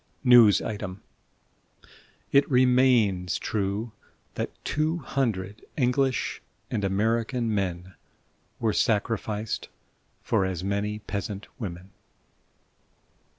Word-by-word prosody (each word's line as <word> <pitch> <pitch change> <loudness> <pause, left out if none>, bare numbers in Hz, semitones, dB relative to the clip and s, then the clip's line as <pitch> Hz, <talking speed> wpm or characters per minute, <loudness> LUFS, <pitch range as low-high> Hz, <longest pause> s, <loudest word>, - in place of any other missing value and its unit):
(News 120 -5 +7
Item: 100 -3 -5 1.3
It 140 +1 +4
remains 125 - +3
true 105 +2 -2 0.4
that - - -3 0.2
two 155 +3 0
hundred 110 - -2
English 130 0 +1 0.3
and 105 - -1
American 115 +4 0
men 95 -2 -2 0.7
were 110 -2 +1
sacrificed 110 -1 -1 0.5
for - - +1
as 95 -2 -2
many 100 +2 -1
peasant 105 -1 -5
women.") 95 -3 -6
105 Hz, 85 wpm, -26 LUFS, 95-125 Hz, 1.3 s, News